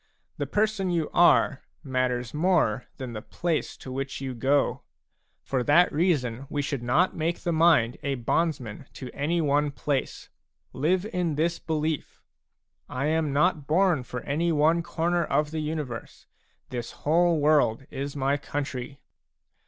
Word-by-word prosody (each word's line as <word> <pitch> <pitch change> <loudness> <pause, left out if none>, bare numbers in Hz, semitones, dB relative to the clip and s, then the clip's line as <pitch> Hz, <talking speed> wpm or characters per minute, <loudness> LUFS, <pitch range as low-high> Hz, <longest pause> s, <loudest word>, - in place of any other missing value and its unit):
The - - -2
person 210 -3 0
you 170 -3 -1
are 165 -4 +4 0.2
matters 125 -3 -1
more 150 - +1
than 130 -3 -6
the 110 - -5
place 165 +7 -2
to 130 - -9
which 135 +1 -4
you 135 -1 -4
go; 135 +4 +1 0.6
for 130 -2 -1
that 150 +8 +4
reason 140 -6 0
we 145 -1 -1
should 140 -2 -3
not 150 +10 +2
make 165 +2 -1
the 175 - -1
mind 160 -8 +4
a 140 0 -1
bondsman 130 -2 -1
to 130 -2 -8
any 165 +4 0
one 145 0 +2
place. 140 -1 -3 0.4
Live 175 +7 +1
in 180 -8 -1
this 165 +3 0
belief: 155 -1 -3 0.4
" - - -56 0.2
I 130 +2 -2
am 160 -2 +1
not 150 0 +1
born 175 -2 +3
for 125 0 -6
any 165 +4 0
one 160 +2 +3
corner 170 +1 0
of 150 -1 0
the 160 - -3
universe; 150 -6 -5 0.4
this 120 -2 -4 0.2
whole 170 +2 +3
world 145 -5 +3
is 140 +1 -4
my 140 0 +1
country." 140 -2 -5
150 Hz, 155 wpm, -26 LUFS, 130-170 Hz, 0.6 s, are